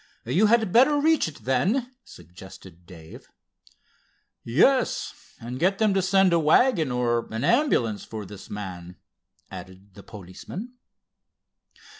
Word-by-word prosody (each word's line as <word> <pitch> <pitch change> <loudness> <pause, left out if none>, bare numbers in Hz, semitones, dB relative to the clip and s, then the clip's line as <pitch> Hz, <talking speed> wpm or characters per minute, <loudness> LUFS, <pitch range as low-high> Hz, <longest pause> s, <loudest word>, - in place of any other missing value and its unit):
"You 175 - +2
had 220 -4 +2
better 270 +5 +5
reach 320 - +2
it, 145 -8 -11
then," 220 - 0
suggested 90 - -15
Dave. 80 -4 -13 1.2
"Yes, 230 - +1 0.3
and 125 +2 -7
get 190 +4 +1
them 215 -2 +2
to 195 - +1
send 190 0 +3
a 170 - +3
wagon, 160 - +3
or 120 -1 -1
an 110 +1 -4
ambulance, 180 - +1
for 110 -2 -8
this 100 +1 -12
man," 90 -4 -8 0.6
added 95 +1 -12
the 100 - -13
policeman. 105 - -10
125 Hz, 125 wpm, -24 LUFS, -, 1.2 s, better